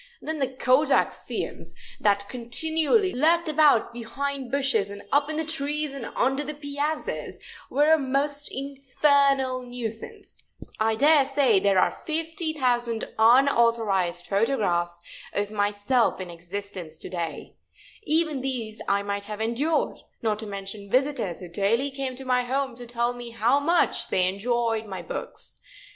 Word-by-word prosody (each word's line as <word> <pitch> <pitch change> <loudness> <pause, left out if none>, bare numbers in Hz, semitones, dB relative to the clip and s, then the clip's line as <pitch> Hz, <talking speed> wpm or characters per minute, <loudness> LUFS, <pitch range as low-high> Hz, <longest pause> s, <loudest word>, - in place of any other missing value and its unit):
Then 315 0 -4
the 270 - +1
kodak 260 +3 +2
fiends, - - -6 0.2
that 200 -1 +2
continually 320 - +1
lurked 330 +5 +3
about 300 -7 +4
behind 270 +3 -4
bushes 270 -8 +1
and 200 0 -8
up 285 +1 +2
in 310 - -3
the 320 - -1
trees 300 -1 0
and 270 -4 -6
under 270 +3 +1
the 300 +1 -5
piazzas, 290 +1 -3 0.3
were 295 +3 +4
a 320 - +4
most 280 +2 0
infernal 275 -1 +1
nuisance. 245 -3 -7 0.4
I 220 0 +2
dare 290 +4 +5
say 270 -6 +3
there 195 0 +2
are 185 - +4
50,000 305 -8 -1
unauthorized 225 -7 +3
photographs 195 -6 0 0.3
of 205 0 -1
myself 205 +4 +1
in 185 -2 -6
existence 175 -1 -7
to - - -7
day. 170 -3 -5 0.5
Even 315 -7 +1
these 240 -5 -3
I 200 0 +1
might 200 0 -3
have 210 0 -6
endured, 250 +8 0 0.2
not 215 -2 0
to 220 - -6
mention 200 0 -7
visitors 255 - 0
who 180 - -7
daily 210 +10 0
came 270 -1 -4
to 265 +1 -7
my 250 -1 +2
home 265 +1 -1
to 245 -1 -9
tell 240 +1 -1
me 245 -1 -8
how 230 +4 +2
much 335 +5 +2
they 185 - +2
had 185 +1 +2
enjoyed 225 +1 -1
my 190 -2 -6
books. - - -7
250 Hz, 150 wpm, -25 LUFS, 210-285 Hz, 0.5 s, dare